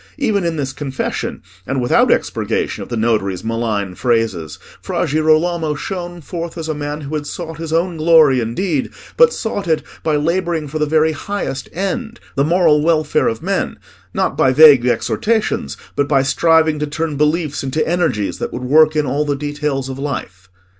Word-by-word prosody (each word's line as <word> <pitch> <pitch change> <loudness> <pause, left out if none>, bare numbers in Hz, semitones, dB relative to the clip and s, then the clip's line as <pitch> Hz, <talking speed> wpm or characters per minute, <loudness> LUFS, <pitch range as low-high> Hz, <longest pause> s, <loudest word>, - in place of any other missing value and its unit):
Even 220 -9 0
in 170 -1 -1
this 135 -3 -3
confession, 135 -1 -4 0.2
and 135 +1 -1
without 120 -1 +3
expurgation - - -1
of - - -8
the 120 - -3
notary's 105 -5 0
malign 110 -4 -2
phrases, 110 - -1 0.2
Fra - - -1
Girolamo 155 +1 +1
shone 175 +1 -5
forth 170 +1 -6
as 160 -1 -4
a 155 - -1
man 145 0 -4
who 145 +1 -7
had 150 -1 -3
sought 165 -1 -6
his 165 -1 -5
own 170 +1 0
glory 155 -4 +5
indeed, 135 - -1 0.3
but 485 -1 +6
sought 205 - -3
it 160 -2 +1 0.2
by 155 -2 0
labouring 165 +1 0
for 155 +3 -4
the 150 - +1
very 160 +1 +3
highest 155 -4 -4
end—the 210 - -3
moral 160 -1 +3
welfare 155 0 +2
of 115 0 -2
men—not - - -3
by 130 - +3
vague 140 -3 +7
exhortations, 125 - 0 0.2
but 145 - +1
by 135 -3 +3
striving 160 +2 +3
to 150 - -1
turn 155 0 -3
beliefs 150 0 0
into 135 +4 -1
energies 165 - 0
that - - -3
would 125 - -5
work 155 +4 +4
in 150 -1 +1
all 140 +3 0
the 145 -1 -1
details 145 -1 -3
of 135 0 -6
life. 95 -10 -5
150 Hz, 175 wpm, -18 LUFS, 130-165 Hz, 0.3 s, vague